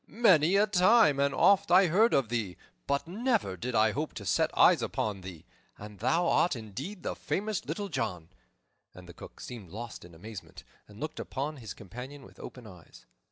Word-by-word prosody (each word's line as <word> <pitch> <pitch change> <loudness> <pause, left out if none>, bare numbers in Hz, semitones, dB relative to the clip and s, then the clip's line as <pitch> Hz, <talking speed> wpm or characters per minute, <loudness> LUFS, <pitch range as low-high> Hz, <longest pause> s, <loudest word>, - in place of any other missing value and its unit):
Many 185 -7 +4
a 205 +1 +5
time 205 -5 +4
and 140 0 +2
oft 195 +7 +4
I 185 +2 +6
heard 205 +8 +3
of 135 -5 +1
thee, 110 -7 -3 0.3
but 140 +3 -1
never 220 - 0
did 120 +6 -4
I 110 0 +4
hope 150 +6 -4
to 100 - -7
set 85 - +2
eyes - - +6
upon 105 -3 -2
thee. 90 -4 -10 0.3
And 105 -1 -11
thou 175 - +1
art 170 - +2
indeed 130 - -7
the - - -3
famous 210 0 -2
Little 205 -1 -3
John!" 90 - -4 0.7
And 90 -1 -12
the 85 - -11
Cook - - -12
seemed 110 -8 -9
lost 115 +5 -8
in 85 -1 -14
amazement, 105 +4 -10 0.2
and 105 0 -15
looked 155 +2 -5
upon 145 +3 -4
his 110 -5 -8
companion 125 +8 -9
with - - -17
open 125 -2 -10
eyes. 90 -5 -15
135 Hz, 190 wpm, -29 LUFS, -, 0.7 s, I